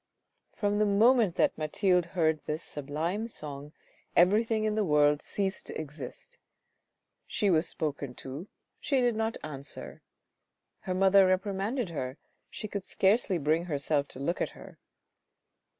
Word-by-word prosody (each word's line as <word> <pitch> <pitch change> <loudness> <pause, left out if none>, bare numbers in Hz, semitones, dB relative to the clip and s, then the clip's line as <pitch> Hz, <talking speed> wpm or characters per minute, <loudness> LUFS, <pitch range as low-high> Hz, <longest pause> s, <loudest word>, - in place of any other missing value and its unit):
From 205 -1 0
the 215 - +3
moment 215 -1 +4
that - - +2
Mathilde 180 +3 +2
heard 160 -2 +2
this 155 +2 -3
sublime 160 +9 -3
song 145 -8 -7 0.4
everything 215 +5 +4
in 215 -1 +1
the 215 0 +1
world 150 -3 +3
ceased 195 -1 -3
to - - -5
exist. 155 - -9 0.9
She 205 -3 +1
was 165 0 +3
spoken 140 -4 -3
to, 140 +8 -7 0.3
she 275 -3 +1
did 245 -2 +2
not 225 +1 -1
answer; 140 -2 -7 0.8
her 185 - -3
mother 195 0 +6
reprimanded 195 +4 0
her, 130 -3 -4 0.3
she 215 - -6
could 200 -1 -4
scarcely 195 0 +2
bring 160 +3 +1
herself 145 -2 0
to - - -9
look 165 +6 -1
at - - 0
her. - - -13
180 Hz, 140 wpm, -29 LUFS, 150-210 Hz, 0.9 s, mother